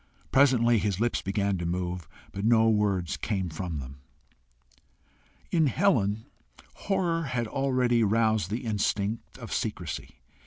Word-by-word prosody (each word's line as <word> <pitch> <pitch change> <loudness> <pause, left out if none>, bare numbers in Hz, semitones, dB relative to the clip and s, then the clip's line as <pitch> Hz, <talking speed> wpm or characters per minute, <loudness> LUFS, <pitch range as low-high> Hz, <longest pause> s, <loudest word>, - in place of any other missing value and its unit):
Presently 120 -4 +4
his 100 -2 -1
lips 120 +1 0
began 100 -1 -1
to 85 - -3
move, 90 -2 -3 0.2
but 100 - -5
no 115 0 +5
words 100 -7 +1
came 95 -4 -2
from 80 0 -4
them. 70 -1 -8 1.5
In 160 -3 +3
Helen, 115 - +1 0.5
horror 175 -4 -1
had 125 -3 -1
already 125 -1 +1
roused 110 -3 +2
the 115 +4 -3
instinct 105 +1 -1
of 120 -4 -7
secrecy. 95 - -4
110 Hz, 125 wpm, -28 LUFS, 95-120 Hz, 1.5 s, no